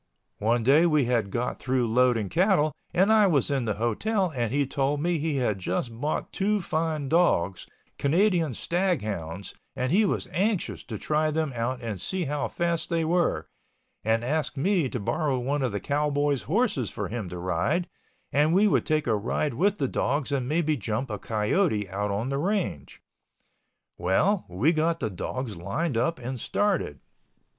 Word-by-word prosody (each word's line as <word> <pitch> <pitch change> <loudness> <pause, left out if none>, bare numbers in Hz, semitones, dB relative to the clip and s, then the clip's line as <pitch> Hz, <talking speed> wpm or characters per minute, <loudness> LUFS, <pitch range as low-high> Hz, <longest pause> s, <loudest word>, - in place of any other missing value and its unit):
One 115 +2 +1
day 145 +8 +5
we 150 -5 +3
had 115 -4 +1
got 120 +5 -2
through 130 -2 0
loading 120 -2 +2
cattle 170 - +2 0.2
and 195 +5 +4
I 215 -2 +6
was 145 -6 +2
in 135 -4 0
the 110 -3 -1
hotel 175 - 0
and 120 -3 -1
he 140 +1 +2
told 140 +2 0
me 170 +1 0
he 155 0 -1
had 115 -7 0
just 95 +6 -2
bought 150 +1 -2
two 210 +2 +1
fine 160 -4 -1
dogs, 115 - +2 0.3
Canadian 165 - +2
stag 175 - 0
hounds, 95 -3 -5 0.2
and 130 +1 -1
he 205 +6 +4
was - - -1
anxious 195 +3 -1
to - - -5
try 155 0 0
them 155 -2 -1
out 120 +2 -2
and 105 -6 -4
see 190 -2 -1
how 145 0 -1
fast 170 -1 -1
they 165 -2 +1
were, 160 - +1 0.6
and 115 +1 +1
asked 150 +3 -1
me 170 -1 +2
to 125 - -3
borrow 140 +6 0
one 135 +4 -1
of 130 -3 0
the 100 - -2
cowboys' 145 0 0
horses 200 - +1
for - - -4
him 110 -5 -4
to 90 - -6
ride 95 - 0 0.5
and 150 +4 +3
we 205 +3 +5
would - - +1
take 155 -2 +1
a 115 - +2
ride 120 +7 -1
with 200 - +1
the 135 - 0
dogs 140 +3 -1
and 130 -3 -1
maybe 155 0 +1
jump 110 +1 -3
a 105 - -3
coyote 110 - 0
out 105 +2 -1
on 105 +6 -2
the 135 0 -1
range. 175 - -2 1.0
Well, 135 - +2
we 110 - +2
got 160 +1 +1
the 110 - -2
dogs 115 +4 -4
lined 120 - -2
up 125 +8 +1
and 125 0 -5
started. 185 - -1
140 Hz, 180 wpm, -26 LUFS, 115-170 Hz, 1.0 s, I